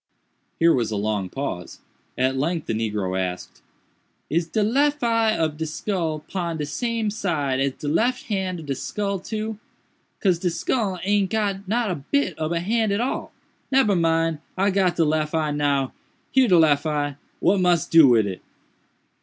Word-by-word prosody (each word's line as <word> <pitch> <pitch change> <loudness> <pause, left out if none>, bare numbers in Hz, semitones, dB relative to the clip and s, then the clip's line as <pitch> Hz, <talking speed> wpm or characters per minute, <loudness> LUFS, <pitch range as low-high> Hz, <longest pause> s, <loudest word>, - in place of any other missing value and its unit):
Here 165 0 +5
was 120 -3 0
a 110 - -3
long 100 -2 -1
pause. 95 -10 -5 0.4
At 130 +1 +1
length 160 +4 -1
the - - -2
negro 105 -4 -2
asked, 90 -1 -5 0.7
"Is 165 +1 +1
de 210 +6 0
lef 285 +6 +2
eye 230 -2 +2
of 155 -2 -1
de 160 0 -3
skull 160 -1 -2
pon 170 -4 -3
de 150 - -2
same 230 - -2
side 155 -11 -1
as 135 0 +1
de 145 - -7
lef 240 +12 +1
hand 190 -5 -2
of - - -10
de 140 - -1
skull, 200 +8 -3
too?—cause 215 -3 -4
de 180 - 0
skull 195 +2 -1
aint 200 0 +2
got 200 -3 -1
not 225 0 0
a 145 -6 -5
bit 285 0 +2
ob 155 +1 -1
a 170 -1 0
hand 220 +3 +1
at 200 - +1
all—nebber 260 -2 -1
mind! 165 -2 +1 0.2
I 195 +1 +2
got 185 -2 +2
de 165 - +3
lef 155 +1 0
eye 155 -2 +1
now—here 145 - 0
de 180 -4 +5
lef 150 -2 +4
eye! 145 -2 -1 0.2
what 200 - +3
mus 175 -2 +3
do 165 -3 +7
wid 115 -4 +4
it?" 95 -2 -5
170 Hz, 175 wpm, -23 LUFS, 145-205 Hz, 0.7 s, do